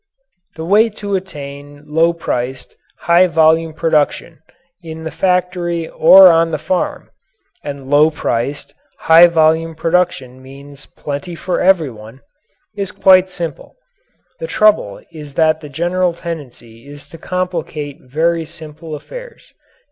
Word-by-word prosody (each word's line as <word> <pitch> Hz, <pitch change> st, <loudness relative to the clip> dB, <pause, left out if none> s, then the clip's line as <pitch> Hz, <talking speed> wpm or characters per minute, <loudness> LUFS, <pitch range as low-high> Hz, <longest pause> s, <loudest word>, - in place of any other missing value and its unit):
The 160 Hz, 0 st, -6 dB
way 210 Hz, +6 st, +4 dB
to 200 Hz, -1 st, -3 dB
attain 145 Hz, -5 st, -8 dB
low 160 Hz, +3 st, +2 dB
priced, 130 Hz, -6 st, -5 dB, 0.3 s
high 175 Hz, +2 st, +4 dB
volume 160 Hz, -1 st, +2 dB
production 160 Hz, +1 st, -1 dB, 0.4 s
in 160 Hz, -1 st, -9 dB
the 160 Hz, -, -5 dB
factory 175 Hz, 0 st, -1 dB
or 185 Hz, +2 st, +7 dB
on 165 Hz, 0 st, +2 dB
the 155 Hz, -, -2 dB
farm 175 Hz, +5 st, -3 dB, 0.5 s
and 140 Hz, -2 st, -7 dB
low 145 Hz, +3 st, +4 dB
priced, 140 Hz, -2 st, -3 dB, 0.3 s
high 165 Hz, +2 st, +7 dB
volume 160 Hz, 0 st, +1 dB
production 165 Hz, -7 st, -1 dB
means 140 Hz, +2 st, -13 dB
plenty 150 Hz, +5 st, -7 dB
for 180 Hz, +2 st, -3 dB
everyone 135 Hz, -, 0 dB, 0.5 s
is 200 Hz, -2 st, -4 dB
quite 185 Hz, -1 st, +4 dB
simple. 170 Hz, -4 st, -6 dB, 0.6 s
The -, -, -5 dB
trouble 215 Hz, -, +1 dB
is 150 Hz, -4 st, -11 dB
that 160 Hz, -1 st, +2 dB
the 150 Hz, -, -10 dB
general 175 Hz, +4 st, -1 dB
tendency 135 Hz, -8 st, -9 dB
is 145 Hz, 0 st, -11 dB
to 165 Hz, -, -12 dB
complicate 165 Hz, -5 st, -4 dB
very 165 Hz, +5 st, -1 dB
simple 160 Hz, 0 st, -10 dB
affairs. -, -, -11 dB
160 Hz, 125 wpm, -16 LUFS, 145-175 Hz, 0.6 s, or